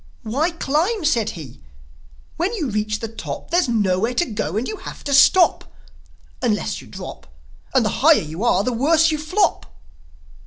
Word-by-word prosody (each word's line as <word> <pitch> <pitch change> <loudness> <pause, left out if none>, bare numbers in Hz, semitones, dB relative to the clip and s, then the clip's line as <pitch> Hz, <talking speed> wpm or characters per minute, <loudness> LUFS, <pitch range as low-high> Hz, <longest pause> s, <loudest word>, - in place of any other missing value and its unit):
"Why 270 +10 0
climb?" 335 +5 -1
said 235 - 0
he. 135 -5 -11 0.7
"When 355 +5 -1
you 305 - -3
reach 215 0 -2
the 225 - -3
top 225 +8 -8
There's 345 -6 +2
nowhere 215 +1 +1
to 350 - +2
go, 205 - -3
and 235 - -2
you 430 - -5
have - - -10
to 285 - -2
stop, 345 +6 +5 0.8
Unless 220 -5 -1
you - - -15
drop. - - -9 0.5
And - - +4
the - - +1
higher - - +7
you 160 +7 -6
are 200 -5 +2
the 250 - -1
worse 320 +6 +3
you 305 - -2
flop." 310 - 0
250 Hz, 170 wpm, -21 LUFS, 210-325 Hz, 0.8 s, higher